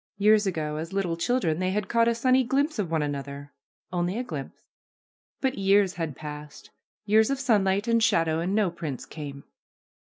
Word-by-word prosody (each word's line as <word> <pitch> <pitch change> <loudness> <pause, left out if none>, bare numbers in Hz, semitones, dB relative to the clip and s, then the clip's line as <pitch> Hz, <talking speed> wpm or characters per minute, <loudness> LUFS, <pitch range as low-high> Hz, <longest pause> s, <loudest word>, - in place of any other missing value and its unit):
Years 210 +1 +4
ago, 155 -4 -2
as 165 +3 -5
little 190 -4 0
children, 170 -4 0
they 185 0 0
had 205 +1 -1
caught 230 0 +3
a 235 - +2
sunny 255 +2 +3
glimpse 275 +2 0
of 190 -5 -1
one 160 -2 0
another 140 0 -5 0.2
— - - -55
only 175 +3 -1
a 245 - -1
glimpse. 150 - -8 0.8
But 265 -5 -1
years 195 -1 +3
had 160 -5 -4
passed, 150 0 -9 0.3
years 220 +2 +4
of 275 -1 -1
sunlight 205 -4 +2
and 230 0 +3
shadow, 165 -8 +2
and 180 +4 -1
no 210 -5 +2
prince 155 -6 -6
came. 140 -3 -8
190 Hz, 180 wpm, -26 LUFS, 155-220 Hz, 0.8 s, Years